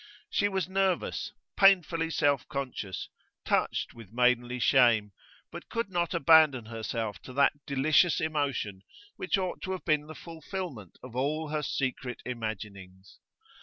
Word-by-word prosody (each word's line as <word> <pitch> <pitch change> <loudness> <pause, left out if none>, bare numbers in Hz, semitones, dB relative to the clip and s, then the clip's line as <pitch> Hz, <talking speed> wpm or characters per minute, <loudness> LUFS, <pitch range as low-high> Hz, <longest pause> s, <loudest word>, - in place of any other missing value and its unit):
She 205 - +2
was 190 -3 -1
nervous, 190 -1 -1 0.2
painfully 175 -4 +4
self 140 -4 +1
conscious, 125 - -4 0.4
touched - - 0
with 115 -4 -13
maidenly 125 +1 +2
shame, 120 -5 +4 0.4
but - - -9
could 230 -4 -3
not 175 0 -1
abandon 160 -7 +5
herself 110 -2 -4
to 130 - -11
that 140 +1 +4
delicious 150 +5 +3
emotion 140 -11 -2 0.3
which 370 - 0
ought 185 -2 -3
to 190 - -3
have 185 - -7
been 150 -2 +1
the 155 - -9
fulfilment 165 - -7
of 125 -2 -10
all 150 +4 -1
her 155 0 -1
secret 130 -3 -3
imaginings. 100 -5 -7
140 Hz, 135 wpm, -29 LUFS, 115-165 Hz, 0.4 s, abandon